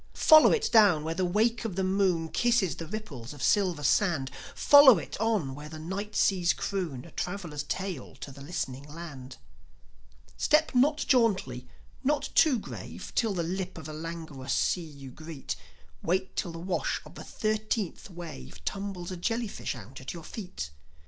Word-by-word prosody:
Follow 310 -1 +8
it 450 - +1
down 200 -9 +6
where 160 +1 -2
the 185 +3 -1
wake 220 +7 +1
of 220 -6 -3
the 190 - 0
moon 185 -3 +1
Kisses 235 -5 +2
the 165 - -7
ripples 155 - -7
of 145 -3 -8
silver 185 -7 +2
sand; 150 -6 +2 0.2
Follow 285 -6 +8
it 160 - -6
on 210 -12 +1
where 150 +2 -9
the 160 - -8
night 195 +6 -5
seas 180 -3 +3
croon 170 -11 -3
A 170 - -13
traveller's 175 -6 -4
tale 180 0 -4
to 140 - -9
the 140 +1 -12
listening 140 -4 -4
land. 145 -5 -9 1.0
Step 310 0 +3
not 295 +5 +3
jauntily, 190 - +2 0.4
not 290 +2 +1
too 300 -6 +5
grave, 215 - -8
Till 225 -4 +1
the 170 - 0
lip 180 +2 -3
of 160 - -8
the 155 - -6
languorous 160 -4 -5
sea 180 - +1
you 140 -5 -10
greet; 155 +1 -6 0.5
Wait 190 +3 -1
till 175 - -2
the 165 - -8
wash 175 +1 -1
of - - -13
the - - -9
thirteenth 215 -3 -2
wave 70 - -9
Tumbles 195 - -4
a 185 - -5
jellyfish 225 - -2
out 120 +2 -10
at 130 - -6
your 170 - -8
feet. 155 - -6
175 Hz, 170 wpm, -29 LUFS, 150-210 Hz, 1.0 s, Follow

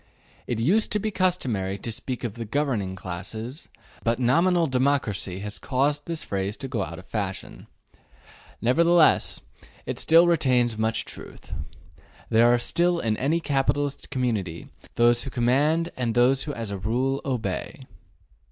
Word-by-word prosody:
It 120 - -2
used 190 - +3
to 210 - +1
be 215 +1 -2
customary 120 - 0
to 115 - -5
speak 125 +3 -5
of 115 -4 -3
the 115 - -6
``governing 115 -8 -1
classes,'' 110 - -6 0.4
but 115 +1 +1
nominal 170 +8 +3
democracy 130 - 0
has 105 0 -6
caused 145 +2 0
this 165 -2 -3
phrase 100 +1 -2
to 135 - -5
go 120 -6 -2
out 85 0 -7
of 95 - -11
fashion. 95 -1 -5 1.0
Nevertheless, 170 +7 +4 0.4
it - - -4
still 165 +2 +6
retains 130 -9 +2
much 110 +1 -1
truth; - - -10 0.8
there 115 +2 +5
are 120 - +4
still 175 +8 +1
in 110 -6 0
any 150 +6 +1
capitalist 145 -1 -1
community 110 - -2 0.3
those 120 0 +4
who 135 - -4
command 145 +8 +1
and 120 -3 -2
those 130 +2 +3
who 150 - -4
as 115 -3 -4
a 100 - -4
rule 125 +7 0
obey. 125 - -3
125 Hz, 150 wpm, -25 LUFS, 110-145 Hz, 1.0 s, still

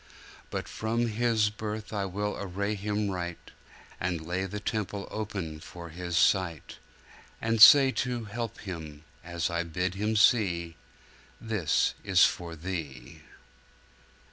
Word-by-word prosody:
'But - - -4
from 115 +2 -1
his 110 -2 +1
birth 105 0 -6
I 100 -2 -1
will 105 +2 -3
array 100 +2 -2
him 105 0 -2
right, 85 -2 -6 0.5
And 90 -2 -1
lay 90 +3 -2
the 105 +2 -5
temple 105 -1 -3
open 100 -7 -4
for 85 +2 -10
his 85 +1 -3
sight, 85 -5 +1 0.6
And 115 -1 0
say 135 +3 +10
to 125 -2 -3
help 115 +1 -5
him, 80 -6 -7 0.2
as 85 0 -2
I 85 0 0
bid 90 +2 -2
him 105 +3 -1
see: 90 -8 +3 0.6
"This 105 -9 +1
is 95 -3 +5
for 85 -2 -3
thee!" 80 -6 -6
100 Hz, 130 wpm, -28 LUFS, 85-105 Hz, 0.6 s, say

